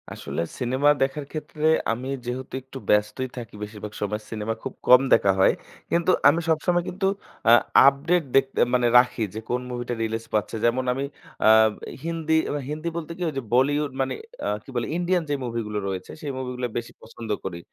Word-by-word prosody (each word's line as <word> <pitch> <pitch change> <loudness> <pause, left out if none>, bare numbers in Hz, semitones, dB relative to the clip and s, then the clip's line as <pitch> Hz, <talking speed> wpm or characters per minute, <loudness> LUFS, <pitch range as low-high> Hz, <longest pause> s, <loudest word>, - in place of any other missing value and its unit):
আসলে - - -4 0.2
সিনেমা 130 +4 +2
দেখার 140 +2 0
ক্ষেত্রে 155 0 -4 0.3
আমি 125 +3 -3 0.2
যেহেতু 125 +2 -5
একটু 130 +1 -11
ব্যস্তই 105 +5 +2
থাকি 115 -4 -8
বেশিরভাগ 105 0 -7
সময়, 105 +1 -2
সিনেমা 110 0 -2
খুব - - -5
কম 125 +1 +8
দেখা 100 - +5
হয়। 95 - +5 0.4
কিন্তু 170 +1 +3 0.2
আমি 165 - +5
সবসময় 175 +2 +2
কিন্তু 190 +2 -3 0.4
অ্যা 115 - +7 0.3
আপডেট 160 +6 +3
দেখতে 135 0 +2
মানে 125 -1 +3
রাখি 125 -2 +3
যে, 110 - -4
কোন 125 0 0
মুভিটা 120 0 -3
রিলিজ 115 0 -3
পাচ্ছে। 105 0 0
যেমন 120 +2 +2
আমি 135 +2 -3 0.4
অ্যা 110 - +6 0.5
হিন্দি, 165 -1 -1 0.2
এ - - -2 0.2
হিন্দি 155 +2 -4
বলতে 170 -1 -5
কি? - - -11
ওই - - -7
যে, - - 0
বলিউড 145 +3 +2
মানে 135 - -1 0.3
আ - - -1 0.2
কি - - -16
বলে? 120 - 0
ইন্ডিয়ান 175 0 +1
যে, - - +1
মুভিগুলো 115 -3 -3
রয়েছে, 95 -1 -5
সেই 145 - -3
মুভিগুলো 125 -1 -4
বেশি 120 0 -5
পছন্দ 115 0 -10
করি। 90 -3 -5
125 Hz, 185 wpm, -24 LUFS, 115-150 Hz, 0.5 s, কম